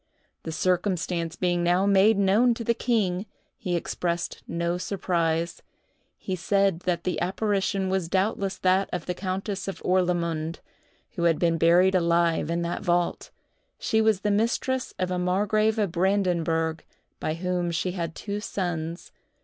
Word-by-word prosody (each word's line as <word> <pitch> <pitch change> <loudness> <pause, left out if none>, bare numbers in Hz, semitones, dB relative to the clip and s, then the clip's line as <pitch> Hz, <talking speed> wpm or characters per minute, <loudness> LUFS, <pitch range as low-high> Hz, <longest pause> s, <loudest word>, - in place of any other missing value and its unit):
The 160 - -5
circumstance 180 -1 0
being 175 -1 0
now 175 +3 +2
made 200 +2 +5
known 210 +5 +4
to 230 - -5
the 235 - +2
king, 215 -5 0 0.3
he 180 -3 -3
expressed 170 0 -2
no 170 +1 -1
surprise; 170 -3 -1 0.6
he 190 - -3
said 195 0 +1
that 170 -1 0
the 180 -2 -2
apparition 195 +1 0
was 185 -3 -1
doubtless 195 0 0
that 185 +1 +2
of 180 -3 -4
a 180 - 0
countess 190 +2 -4
of 195 - -4
Orlamunde, 170 -3 0 0.5
who 175 -7 -2
had 165 -2 +4
been 165 -1 +1
buried 175 +3 +5
alive 170 -3 +2
in 170 +1 0
that 170 - -3
vault. 175 -2 0 0.5
She 220 - +1
was 220 -3 +2
the 210 - +1
mistress 240 +5 0
of 185 0 -1
a 180 - 0
margrave 210 +4 +1
of 205 -5 0
Brandenburg, 170 -3 +1 0.4
by 155 - -2
whom 180 0 -1
she 170 +2 -1
had 170 -3 -4
two 205 0 -4
sons. 175 -5 -4
180 Hz, 150 wpm, -26 LUFS, 170-195 Hz, 0.6 s, made